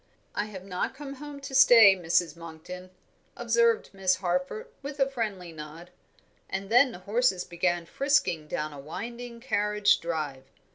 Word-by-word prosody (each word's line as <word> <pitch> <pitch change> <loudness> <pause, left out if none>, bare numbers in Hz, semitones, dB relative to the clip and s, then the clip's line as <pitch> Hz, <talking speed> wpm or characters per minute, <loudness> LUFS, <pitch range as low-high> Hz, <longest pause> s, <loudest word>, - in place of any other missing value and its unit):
"I 205 - -1
have 190 -3 -9
not 185 +5 -3
come 275 -1 -8
home 290 -1 -8
to 275 0 -8
stay, 235 -7 +8
Mrs. 175 -1 0
Monkton," 170 +2 -10 0.5
observed 465 -1 +2
Miss 190 -1 +2
Harford, 180 - -2 0.2
with 280 +1 -7
a 270 - +4
friendly 210 -9 -4
nod, 160 +2 -10 0.6
and 195 +2 -4
then 250 +2 +6
the - - -9
horses 205 -3 +1
began 175 0 -1
frisking 180 - +1
down 150 0 -3
a 145 - -9
winding 235 - -7
carriage 210 -4 +2
drive. 150 -6 -4
195 Hz, 150 wpm, -28 LUFS, 170-245 Hz, 0.6 s, stay